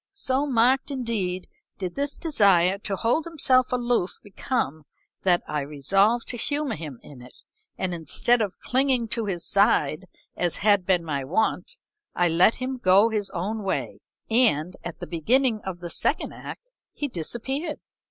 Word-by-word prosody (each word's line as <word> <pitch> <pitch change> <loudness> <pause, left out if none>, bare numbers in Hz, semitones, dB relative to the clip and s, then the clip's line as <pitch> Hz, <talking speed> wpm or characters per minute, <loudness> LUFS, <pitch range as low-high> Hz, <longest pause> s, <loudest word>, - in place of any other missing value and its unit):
So 280 -6 0
marked 255 +2 +3
indeed 220 -9 -3 0.3
did 185 -2 -4
this 285 0 -2
desire 200 - +3
to 200 -1 -3
hold 240 - 0
himself 260 -6 +2
aloof 240 -6 0
become 190 - -3 0.4
that 180 -2 +2
I 150 -1 -2
resolved 195 - +1
to 245 - 0
humor 290 +4 -1
him 150 -6 -7
in 135 -4 -13
it, 125 0 -13 0.4
and 185 -1 -2
instead 175 - +2
of 200 -3 -2
clinging 255 -3 +1
to 230 -1 0
his 180 -4 -3
side 200 -4 +2 0.3
as 175 -2 0
had 205 -4 +4
been 180 -3 +2
my 145 -4 -3
wont, 180 +11 -1 0.4
I 175 -1 +2
let 175 +7 +4
him 260 +1 -4
go 195 +2 +5
his 210 -3 -2
own 205 +5 -3
way, 195 - -3 0.3
and, 200 - +2
at 175 - -7
the - - -4
beginning 225 - +1
of 180 -2 -6
the 175 -1 -6
second - - 0
act, - - -10 0.2
he 290 - -3
disappeared. 265 - -4
205 Hz, 160 wpm, -25 LUFS, 175-255 Hz, 0.4 s, go